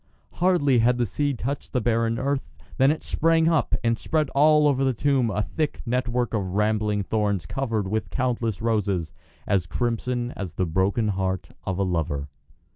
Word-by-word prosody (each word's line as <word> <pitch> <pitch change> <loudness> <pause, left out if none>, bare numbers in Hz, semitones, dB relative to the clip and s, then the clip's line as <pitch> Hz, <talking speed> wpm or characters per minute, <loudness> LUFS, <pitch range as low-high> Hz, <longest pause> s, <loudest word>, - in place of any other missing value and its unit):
Hardly 170 -8 +3
had 120 +2 +3
the 120 - +1
seed 140 +5 -1
touched 135 +6 -4
the 125 - +2
barren 115 0 +1
earth 130 - -2 0.2
than 135 +1 +5
it 155 - -1
sprang 165 0 +2
up 165 -2 +2
and 115 0 +1
spread 155 -3 0
all 150 +1 +5
over 135 -2 +2
the 130 -2 +1
tomb 135 -2 +2
a 105 0 -1
thick 155 +7 -2
network 125 0 -1
of 95 -4 -2
rambling 105 -1 +1
thorns 100 -3 -1
covered 110 -2 -2
with 110 +2 -2
countless 115 -5 -1
roses 100 -8 0 0.3
as 95 -4 +1
crimson 120 +3 -2
as 95 -9 -6
the 95 - 0
broken 95 +6 +1
heart 95 -3 -2 0.2
of 95 -1 -1
a 100 - +1
lover. 75 -6 -2
115 Hz, 175 wpm, -25 LUFS, 100-135 Hz, 0.3 s, than